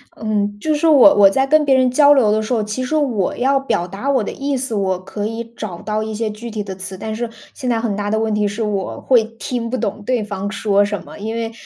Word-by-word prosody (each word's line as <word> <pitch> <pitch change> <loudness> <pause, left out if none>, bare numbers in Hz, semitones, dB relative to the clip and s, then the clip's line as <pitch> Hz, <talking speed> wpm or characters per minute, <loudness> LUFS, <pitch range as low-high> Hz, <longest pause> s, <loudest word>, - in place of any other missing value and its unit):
嗯， 205 -2 -2
就 310 +7 0
是 300 +2 +1
我 295 -1 +7
我 200 -1 +7
在 265 +7 +1
跟 305 +2 +4
别 275 -2 +3
人 255 -1 +3
交 285 +2 +5
流 235 -7 +3
的 215 - +2
时 215 - -5
候， 230 -3 +1
其 210 +5 -3
实 255 +5 -2
我 250 -11 0
要 270 +2 +2
表 180 -10 -1
达 200 +9 -4
我 260 -5 +2
的 - - -4
意 280 0 -2
思， 255 -2 -3
我 190 -3 0
可 205 +2 -4
以 225 +1 -4
找 185 -7 -6
到 215 0 -1
一 220 0 -4
些 220 +1 -2
具 230 +3 -8
体 215 -1 -4
的 195 -1 -6
词。 190 0 -8
但 220 +3 -5
是 235 +1 -3 0.2
现 255 - -4
在 235 -2 +1
很 225 -3 -1
大 205 0 -3
的 220 - +1
问 220 -1 0
题 210 0 +1
是 210 +3 -3
我 200 -3 -3
会 245 -4 +3
听 235 -2 -3
不 255 - -2
懂 210 -2 -3
对 245 -1 0
方 200 -1 -4
说 205 -2 +2
什 205 0 -3
么， - - -12
因 220 +2 -4
为 230 -1 -3
220 Hz, 295 characters per minute, -19 LUFS, 205-255 Hz, 0.2 s, 我